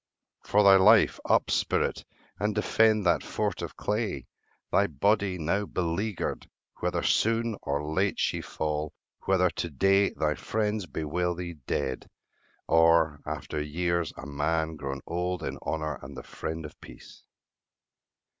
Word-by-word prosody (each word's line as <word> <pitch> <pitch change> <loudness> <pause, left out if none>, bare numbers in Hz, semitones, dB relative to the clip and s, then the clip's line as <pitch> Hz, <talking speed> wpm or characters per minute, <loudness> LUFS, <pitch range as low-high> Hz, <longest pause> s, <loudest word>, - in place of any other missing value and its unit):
For 105 +1 +3
thy 100 -1 +8
life, 105 +3 +5
Up, - - +3
spirit, - - 0 0.3
and 105 0 0
defend 110 -1 +3
that 85 -2 +3
fort - - -2
of - - -6
clay, 105 +1 -2 0.5
Thy 100 - +3
body, 100 +4 +1
now 95 +5 -1
beleaguered; 90 +3 -2 0.3
whether - - -1
soon 115 0 +2
Or 70 +1 -2
late 95 +6 0
she - - 0
fall; 75 -1 -3 0.3
whether 90 -2 +3
to 85 +1 -3
day 95 +6 +3
thy 75 -1 -1
friends 105 +1 -2
Bewail 85 +4 -2
thee 85 0 -5
dead, 65 -3 -2 0.6
or, 80 -2 +4
after 75 - -4
years, 85 +2 -1
a - - -8
man 80 +3 -1
Grown 70 -3 -5
old 90 0 -2
in - - -4
honour 75 -3 -3
and 65 0 -10
the - - -7
friend 80 0 -6
of 75 - -12
peace. - - -13
85 Hz, 140 wpm, -28 LUFS, 75-100 Hz, 0.6 s, thy